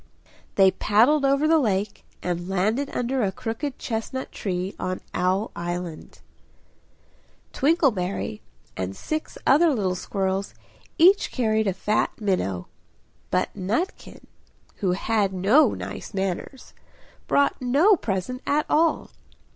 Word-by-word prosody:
They 190 -1 +6
paddled 230 +10 +3
over 275 +2 +3
the 320 0 +5
lake 205 -5 -1 0.2
and 175 0 -3
landed 215 +9 0
under 250 +2 -1
a 200 -3 +1
crooked 230 +8 -4
chestnut 235 +3 -4
tree 185 -1 -3
on 185 0 -2
Owl 190 +4 0
Island. 175 -1 -6 1.3
Twinkleberry 225 - +1 0.3
and 95 +1 -4
six 310 - -4
other 320 +5 +5
little 200 -8 0
squirrels 190 +1 -2 0.4
each 370 +5 +5
carried 220 -3 +1
a 195 - +1
fat 210 +3 -1
minnow; 180 - -1 0.6
but 180 - 0
Nutkin, 215 - -3 0.5
who 185 -3 0
had 200 0 0
no 200 +12 +4
nice - - -7
manners, 195 +7 -4 0.5
brought 280 -1 +2
no 290 +12 +4
present 225 - -3
at 300 +1 +2
all. 325 +2 +1
210 Hz, 115 wpm, -24 LUFS, 185-275 Hz, 1.3 s, They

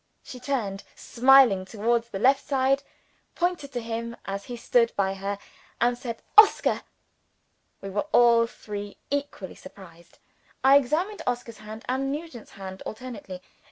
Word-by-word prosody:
She 250 - -10
turned 235 -7 -3
smiling, 250 -6 +5
towards 230 +4 -1
the 195 - -5
left 265 +6 +3
side, 275 0 +1 0.5
pointed 345 -5 -1
to 245 - -2
him 230 +1 -5
as 195 0 -5
he 245 - -7
stood 235 0 +2
by 195 -1 +1
her, 195 +1 -4 0.4
and 240 +1 +2
said, 240 -2 -7 0.2
"Oscar!" 430 - +5 1.0
We 195 - -6
were 205 +9 -2
all 235 -1 +5
three 205 -3 -8
equally 280 -10 -3
surprised. 170 -3 -15 0.5
I 270 +1 +8
examined 325 +9 -1
Oscar's 245 -2 -3
hand 215 +1 -10
and 270 +2 -1
Nugent's 295 -6 -7
hand 190 -1 -9
alternately. 215 -6 -8
235 Hz, 140 wpm, -26 LUFS, 200-270 Hz, 1.0 s, I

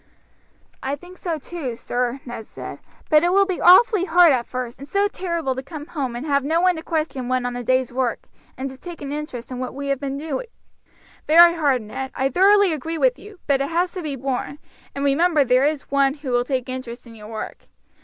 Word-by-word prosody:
"I 270 +2 -2
think 355 +5 -15
so 335 -3 -2
too, 290 -5 -5
sir," 245 +3 -2
Ned 240 -3 -7
said, - - -8 0.3
"but 305 0 +7
it 350 - +3
will 395 +1 +5
be 375 -3 -3
awfully 370 +1 +6
hard 345 -2 +6
at 245 -3 0
first, 250 -1 -5
and 275 - -9
so 400 +4 +2
terrible 340 -8 -2
to 260 - -5
come 295 +1 -8
home 275 -7 -4
and 245 +5 -5
have 280 -2 +1
no 320 +4 +1
one 365 0 +3
to - - -5
question 310 -6 -2
one 255 0 0
on 245 - -2
the 245 0 -5
day's 255 0 +1
work, 250 -3 -1 0.4
and 265 +2 -3
to 265 - -13
take 345 -4 -9
an 280 - -5
interest 290 -5 -6
in 250 - -5
what 255 0 -5
we 280 0 -4
have 275 -2 0
been 275 -1 -4
doing." 310 - -4 0.8
"Very 340 +2 +8
hard, 285 -8 +1
Ned; 265 +5 -5
I 265 +1 +1
thoroughly 390 +3 +5
agree 320 +3 -4
with - - +2
you, 410 -2 -13
but 275 -2 +2
it 275 - -1
has 350 +2 0
to 370 - -6
be 300 -4 -4
borne, 270 +2 -3 0.4
and 280 0 -2
remember 305 +2 +3
there 255 +1 +3
is 300 -3 -4
One 275 0 +3
who 285 -4 -6
will 245 0 +2
take 255 -1 -2
interest 255 -2 -7
in 230 - -13
your 210 -2 -11
work. 220 -1 -7
280 Hz, 230 wpm, -22 LUFS, 255-335 Hz, 0.8 s, Very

